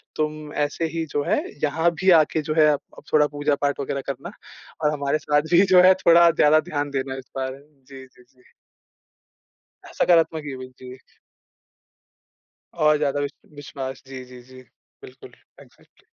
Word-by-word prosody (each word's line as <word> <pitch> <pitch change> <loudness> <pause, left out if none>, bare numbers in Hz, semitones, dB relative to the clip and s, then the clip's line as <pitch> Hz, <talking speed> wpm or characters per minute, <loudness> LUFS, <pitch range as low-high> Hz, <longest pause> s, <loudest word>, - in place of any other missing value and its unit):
तुम 155 -1 -4
ऐसे 150 +3 -2
ही 165 - -2
जो 145 - -1
है - - 0 0.2
यहाँ 160 +3 +1
भी 190 - +3
आके 155 +1 -2
जो 155 +1 -3
है 155 - +6
अब 145 - -9
थोड़ा 150 -1 +4
पूजा 145 0 -1
पाठ 145 0 -1
वग़ैरह 140 0 -3
करना 140 +7 -6 0.5
और 150 - +3
हमारे 140 +1 -1
साथ 150 0 +1
भी 175 - +6
जो 180 - +8
है 185 +1 +7
थोड़ा 170 0 +7
ज़्यादा 155 0 +4
ध्यान 145 -1 -2
देना 135 -1 -3
इस 130 - -11
बार। 130 0 -3
जी, 135 -2 -15
जी, 125 - -23
जी। 125 0 -29 1.4
सकारात्मक 165 -2 +2
युवक, 130 -2 -8
जी। 130 0 -11 1.8
और 150 0 +4
ज़्यादा 145 -1 -1
विश 145 -1 -3 0.2
विश्वास। 135 -2 -8
जी, 130 -1 -8
जी, 125 0 -14
जी। 130 +1 -15 0.4
बिल्कुल, - - -14 0.3
एग्ज़ैक्ट्ली - - -23
145 Hz, 160 wpm, -22 LUFS, 135-155 Hz, 1.8 s, जो